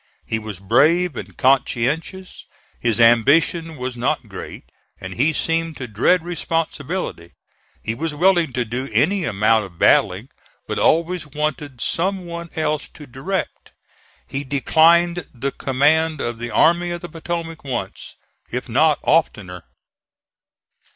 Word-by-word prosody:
He 110 Hz, -, -2 dB
was 105 Hz, -4 st, -7 dB
brave 165 Hz, -, +3 dB
and -, -, -8 dB
conscientious. 140 Hz, +7 st, 0 dB, 0.3 s
His 115 Hz, -2 st, 0 dB
ambition 150 Hz, +8 st, +3 dB
was 125 Hz, 0 st, -4 dB
not 120 Hz, -, -1 dB
great, -, -, -9 dB, 0.4 s
and 95 Hz, 0 st, -7 dB
he 140 Hz, +10 st, +2 dB
seemed 165 Hz, 0 st, -1 dB
to 130 Hz, -, -6 dB
dread 125 Hz, -, +2 dB
responsibility. 165 Hz, -, -3 dB, 0.5 s
He 110 Hz, -, -2 dB
was 150 Hz, +5 st, -4 dB
willing 175 Hz, -1 st, +3 dB
to 120 Hz, -1 st, -1 dB
do 125 Hz, +4 st, -4 dB
any 190 Hz, +2 st, +2 dB
amount 110 Hz, -1 st, +2 dB
of 90 Hz, -3 st, -14 dB
battling, -, -, +3 dB, 0.4 s
but -, -, -2 dB
always 170 Hz, 0 st, +1 dB
wanted 150 Hz, -3 st, -4 dB
some 185 Hz, -, -1 dB
one 170 Hz, 0 st, -7 dB
else 155 Hz, -2 st, -1 dB
to 150 Hz, -, -13 dB
direct. 140 Hz, +9 st, -5 dB, 0.5 s
He 135 Hz, +1 st, -4 dB
declined 165 Hz, +4 st, +3 dB
the 135 Hz, +3 st, -2 dB
command 150 Hz, +5 st, +1 dB
of 120 Hz, -3 st, -3 dB
the 120 Hz, 0 st, -4 dB
Army 175 Hz, +6 st, +3 dB
of 175 Hz, 0 st, -4 dB
the 175 Hz, -, -6 dB
Potomac 165 Hz, 0 st, -5 dB
once, 130 Hz, -4 st, -5 dB, 0.4 s
if 125 Hz, +2 st, -4 dB
not 150 Hz, +6 st, +3 dB
oftener. 95 Hz, -, 0 dB
150 Hz, 135 wpm, -21 LUFS, 120-165 Hz, 0.5 s, brave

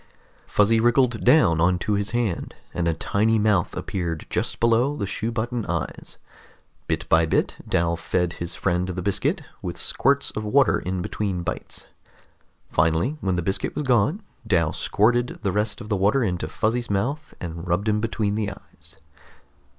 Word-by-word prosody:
Fuzzy 110 Hz, +2 st, +3 dB
wriggled 120 Hz, 0 st, +2 dB
down 125 Hz, -, +5 dB
onto 90 Hz, +4 st, +2 dB
his 100 Hz, 0 st, 0 dB
hand, 115 Hz, -7 st, -2 dB, 0.2 s
and 85 Hz, 0 st, -1 dB
a 85 Hz, -, +2 dB
tiny 110 Hz, +6 st, +1 dB
mouth 105 Hz, -5 st, +1 dB
appeared 85 Hz, -4 st, -3 dB
just -, -, -1 dB
below 120 Hz, +5 st, +2 dB
the 100 Hz, -, -2 dB
shoe 110 Hz, +4 st, -3 dB
button 120 Hz, +1 st, -2 dB
eyes. -, -, -4 dB, 0.7 s
Bit -, -, -2 dB
by 80 Hz, 0 st, +4 dB
bit -, -, +1 dB, 0.2 s
Dal 85 Hz, 0 st, +2 dB
fed 90 Hz, +1 st, -1 dB
his 85 Hz, 0 st, -5 dB
friend 90 Hz, +1 st, 0 dB
the 90 Hz, 0 st, -3 dB
biscuit, 135 Hz, -, 0 dB, 0.2 s
with 90 Hz, -3 st, -5 dB
squirts 140 Hz, +2 st, +1 dB
of 110 Hz, -, -4 dB
water 130 Hz, +5 st, +3 dB
in 90 Hz, 0 st, -3 dB
between 95 Hz, -4 st, -2 dB
bites. -, -, -5 dB, 0.9 s
Finally, 80 Hz, -, +2 dB
when 95 Hz, -2 st, 0 dB
the 90 Hz, -, -1 dB
biscuit 95 Hz, +3 st, -1 dB
was 150 Hz, -, -1 dB
gone, 135 Hz, -, +2 dB, 0.2 s
Dal 85 Hz, -6 st, +2 dB
squirted 120 Hz, +3 st, +1 dB
the 100 Hz, -, +1 dB
rest 105 Hz, +3 st, -1 dB
of 110 Hz, -, -9 dB
the 105 Hz, -, +1 dB
water 100 Hz, +7 st, +2 dB
into 90 Hz, -6 st, -1 dB
Fuzzy's 120 Hz, +8 st, -1 dB
mouth 135 Hz, +11 st, -2 dB
and 85 Hz, 0 st, -6 dB
rubbed 90 Hz, +5 st, 0 dB
him 105 Hz, 0 st, +2 dB
between 110 Hz, -2 st, -1 dB
the 105 Hz, -1 st, -1 dB
eyes. -, -, -13 dB
105 Hz, 165 wpm, -24 LUFS, 90-120 Hz, 0.9 s, down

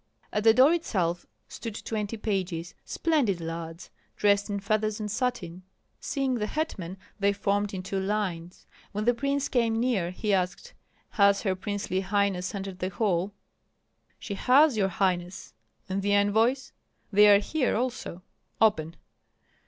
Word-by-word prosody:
At 210 Hz, -, 0 dB
the 225 Hz, 0 st, +7 dB
door 270 Hz, +6 st, +6 dB
itself 180 Hz, -, -1 dB, 0.2 s
stood 225 Hz, -3 st, -7 dB
twenty 215 Hz, 0 st, -3 dB
pages, 185 Hz, -5 st, -3 dB
splendid 280 Hz, -, 0 dB
lads, 165 Hz, +1 st, -6 dB, 0.3 s
dressed 205 Hz, 0 st, +2 dB
in 200 Hz, 0 st, -2 dB
feathers 215 Hz, +1 st, 0 dB
and 210 Hz, -1 st, -3 dB
satin. 210 Hz, -8 st, -2 dB, 0.4 s
Seeing 270 Hz, -2 st, -1 dB
the 215 Hz, -4 st, -1 dB
hetman, 195 Hz, -, -4 dB, 0.2 s
they 200 Hz, 0 st, +3 dB
formed 200 Hz, 0 st, 0 dB
in 190 Hz, -3 st, -5 dB
two 195 Hz, +1 st, -2 dB
lines. 190 Hz, -4 st, -3 dB, 0.3 s
When 210 Hz, +1 st, -2 dB
the 245 Hz, -, +4 dB
prince 280 Hz, +3 st, -1 dB
came 230 Hz, -3 st, +1 dB
near, 230 Hz, -8 st, +1 dB
he 205 Hz, +3 st, -2 dB
asked, 180 Hz, -2 st, -1 dB, 0.4 s
"Has 200 Hz, -3 st, +4 dB
her 190 Hz, -3 st, +1 dB
princely 195 Hz, -1 st, -2 dB
highness 200 Hz, -1 st, 0 dB
entered 195 Hz, -2 st, -6 dB
the 185 Hz, -, -1 dB
hall?" 190 Hz, -1 st, 0 dB, 0.9 s
"She 205 Hz, -, -6 dB
has, 265 Hz, +6 st, +4 dB
your 200 Hz, -3 st, +2 dB
highness." 180 Hz, -1 st, -2 dB, 0.3 s
"And 190 Hz, +1 st, -2 dB
the 205 Hz, +1 st, +1 dB
envoys?" 225 Hz, +6 st, +2 dB, 0.4 s
"They 210 Hz, +1 st, +7 dB
are 205 Hz, -1 st, +8 dB
here 255 Hz, +6 st, 0 dB
also." 235 Hz, -6 st, -3 dB, 0.4 s
"Open!" 170 Hz, -7 st, +2 dB
205 Hz, 145 wpm, -27 LUFS, 185-225 Hz, 0.9 s, are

